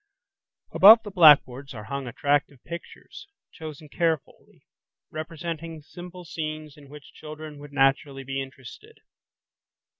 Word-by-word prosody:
Above 220 +3 +9
the 205 - -8
blackboards 140 -7 +5
are 105 - -8
hung 135 +4 -5
attractive 145 +3 0
pictures, 170 +1 -10 0.2
chosen 155 -2 -10
carefully, 160 -1 -3 0.5
representing 165 0 -6
simple 180 +2 -11
scenes 155 -1 -6
in 145 -2 -17
which 150 0 -14
children 155 -1 -10
would 145 0 -12
naturally 135 0 +1
be 135 +1 -4
interested. 130 -2 -12
150 Hz, 115 wpm, -25 LUFS, 140-165 Hz, 0.5 s, Above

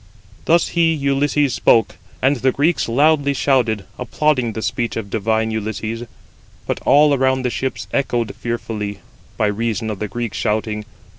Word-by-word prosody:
Thus 170 +1 +3
he 165 -1 +2
[Ulysses] 140 -1 +1
spoke, 115 -3 +3 0.3
and 135 +2 +3
the 130 +2 +2
Greeks 150 -1 +1
loudly 140 +2 +3
shouted, 120 -7 +1
applauding 125 -2 0
the 110 - -5
speech 120 -2 -2
of 100 -3 -5
divine 110 +1 0
Ulysses; 110 +2 -4 0.6
but - - -2
all 150 0 +6
around 130 -1 +1
the 125 - 0
ships 130 +2 -3
echoed 120 -5 0
fearfully, 105 -4 -4 0.4
by - - +2
reason 110 +1 -1
of 100 - -6
the 105 - -2
Greeks 120 0 -4
shouting. 105 -1 -1
120 Hz, 150 wpm, -19 LUFS, 110-140 Hz, 0.6 s, all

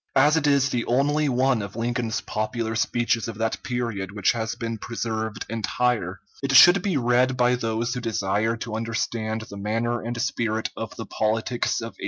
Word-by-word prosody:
As 145 +3 +5
it 155 -2 +2
is 140 -1 +3
the 120 -1 0
only 145 +4 +2
one 130 -2 +2
of 100 0 -7
Lincoln's 115 0 -1
popular 110 +1 -3
speeches 115 0 0
of 115 -2 -6
that 110 0 -1
period 115 -7 -3
which 105 -2 +2
has 110 -1 -3
been 115 -2 -4
preserved 110 -2 -3
entire, 115 -3 -1 0.2
it 135 -1 -1
should 175 +7 +9
be 190 -6 0
read 125 +1 +2
by 125 0 +3
those 115 0 -1
who 125 - -4
desire 110 0 0
to 115 -1 -6
understand 115 0 -2
the 100 -2 -9
manner 115 +4 -1
and 120 +1 -4
spirit 115 -3 -1
of - - -6
the - - -6
politics 110 +3 -1
of 115 0 -6
1848. - - -30
115 Hz, 185 wpm, -24 LUFS, 110-125 Hz, 0.2 s, should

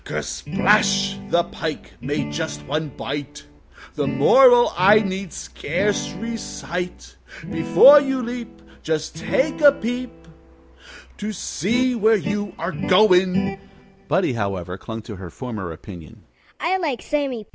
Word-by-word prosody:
Kersplash! 200 +3 +1
The 170 0 +3
Pike 160 -3 -6
made 75 - -3
just 75 0 -4
one 155 0 -2
bite.... 140 - -6 0.5
The - - -2
moral 245 -2 +5
I 195 +4 +6
need 190 -3 -4
scarce 190 +7 -2
recite: 180 -6 -6 0.4
Before 290 +1 +7
you 265 -2 -2
leap 240 0 -7 0.2
Just 155 0 -2
take 265 - -1
a 290 -1 +8
peep 245 +1 -4 1.1
To 210 +1 -3
see 240 - -1
where 225 -1 +3
you 205 0 -2
are 170 +3 -3
going." 190 0 +3 0.5
Buddie, 185 -8 +1
however, 95 -5 -3
clung 110 +3 -8
to 105 -2 -9
her 90 -2 -8
former 105 -4 -6
opinion. 80 -1 -12
190 Hz, 115 wpm, -21 LUFS, 145-220 Hz, 1.1 s, a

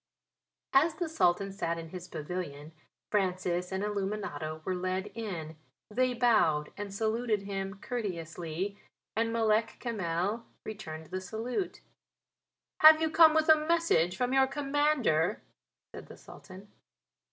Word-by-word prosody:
As 310 +4 +4
the 345 +1 -2
Sultan 195 - +1
sat 170 -4 -2
in 165 -1 -7
his 180 +1 -8
pavilion 155 -2 -6 0.4
Francis 180 -3 0
and 190 +1 -2
Illuminato 195 -7 -3
were 185 - 0
led 185 +2 -2
in. 175 -9 -5 0.3
They 250 +3 +1
bowed 215 -12 +2
and 205 -1 -6
saluted 220 0 0
him 195 0 -4
courteously 180 -4 -4 0.4
and 225 +1 +1
Malek 225 -1 +1
Kamel 205 0 -2 0.2
returned 160 -7 -7
the 185 - -3
salute. 230 - -4 1.0
"Have 310 0 +9
you 320 -1 0
come 315 -1 +7
with 315 0 +3
a 310 -1 +5
message 330 - +2
from 250 +1 0
your 265 0 +5
Commander?" 275 - +1 0.5
said - - -9
the - - -12
Sultan. 190 +2 -13
205 Hz, 130 wpm, -30 LUFS, 175-245 Hz, 1.0 s, Have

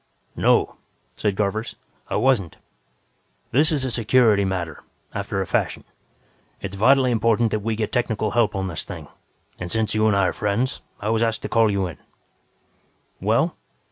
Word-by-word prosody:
"No," - - +2 0.4
said 105 -2 0
Garvers, 105 +3 -2 0.3
"I - - -2
wasn't. 120 -10 +1 0.9
This 150 +6 +4
is 140 -4 0
a 130 - -2
security 115 -3 +3
matter, 90 -5 -3 0.3
after - - -2
a - - -1
fashion. - - -1 0.8
It's 100 0 -6
vitally 130 +5 +4
important 115 0 +2
that 110 - 0
we 110 +2 -2
get 110 -1 -2
technical 110 -4 0
help 115 -3 +2
on 95 0 -1
this 85 -5 -4
thing, - - -9 0.5
and 90 - -5
since 110 +2 0
you 110 0 +3
and 105 - +3
I 100 -1 +3
are - - 0
friends, 110 +6 -1 0.2
I 105 - -2
was 110 0 +1
asked 115 -1 0
to - - -3
call 115 -1 +4
you 100 -2 0
in." 85 -4 -7 1.2
"Well?" - - +2
110 Hz, 170 wpm, -23 LUFS, 100-115 Hz, 1.2 s, This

